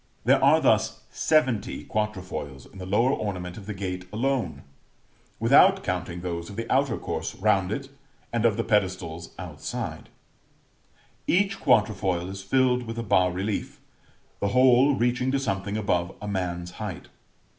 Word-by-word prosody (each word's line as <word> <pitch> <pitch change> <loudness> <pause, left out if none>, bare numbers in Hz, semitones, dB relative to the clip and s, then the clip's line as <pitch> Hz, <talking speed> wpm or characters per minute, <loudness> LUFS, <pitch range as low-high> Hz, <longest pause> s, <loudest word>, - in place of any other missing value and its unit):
There - - +4
are - - +6
thus - - +2
seventy 130 -9 +1
quatrefoils 95 -10 -4
in 95 - -14
the 90 - -6
lower 115 +7 +3
ornament 90 -6 -4
of 100 -2 -10
the 105 - -3
gate 90 -1 -4
alone, 110 - -1 0.8
without - - +5
counting 85 +1 -3
those 85 -1 -4
of 100 - -9
the 115 +1 -4
outer 135 -3 +2
course - - -4
round 95 -2 +2
it, 135 +5 -3 0.5
and 115 -1 0
of 115 -3 +3
the - - 0
pedestals 90 -5 -1
outside: - - -6 1.2
each 195 +2 +2
quatrefoil 95 -5 +2
is 95 0 -7
filled 125 +3 +2
with 115 0 -5
a 115 - -2
bas 90 -4 +3
relief, 95 +4 -3 0.6
the 100 - 0
whole 130 +4 +5
reaching 125 +1 +1
to 140 - +2
something 100 -4 -2
above 90 -4 0
a 105 - -7
man's 90 -3 -3
height. 105 -5 -7
100 Hz, 150 wpm, -26 LUFS, 90-120 Hz, 1.2 s, are